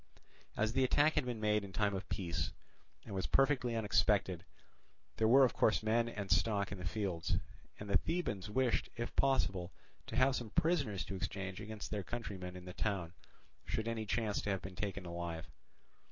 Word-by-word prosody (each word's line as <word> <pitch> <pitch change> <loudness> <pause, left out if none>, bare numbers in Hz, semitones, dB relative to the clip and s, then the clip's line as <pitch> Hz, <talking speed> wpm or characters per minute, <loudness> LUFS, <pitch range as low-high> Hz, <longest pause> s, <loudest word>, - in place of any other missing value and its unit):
As 110 +1 +1
the 130 - +3
attack 145 +4 +4
had - - +1
been 120 -3 -3
made 105 -1 +2
in 100 - -8
time 105 0 +1
of 95 0 -4
peace, 85 -4 -2 0.5
and - - -7
was 95 -1 -1
perfectly 135 -4 +3
unexpected, 100 -4 +2 0.7
there 110 - +3
were 135 +4 +8
of 125 - 0
course 110 - +3
men 115 +2 +2
and 100 -4 -5
stock 100 +1 +2
in 100 - -5
the 90 - -3
fields; 95 -4 -1 0.4
and 105 - -6
the 100 -2 +4
Thebans 105 - -2
wished 125 +2 +1
if 120 0 -4
possible 95 -10 +2 0.4
to - - -5
have 130 0 +4
some 120 -3 -4
prisoners 140 - +1
to 100 - -5
exchange 95 +1 -4
against 110 -1 -6
their 105 - -1
countrymen 95 -4 -5
in 90 -1 -9
the 90 - -7
town, 90 -5 -2 0.5
should 110 +1 -2
any 110 -2 -2
chance 110 -1 0
to - - -3
have 95 -2 -1
been 95 -1 -7
taken 95 0 -3
alive. 85 -1 -4
105 Hz, 185 wpm, -35 LUFS, 95-115 Hz, 0.7 s, were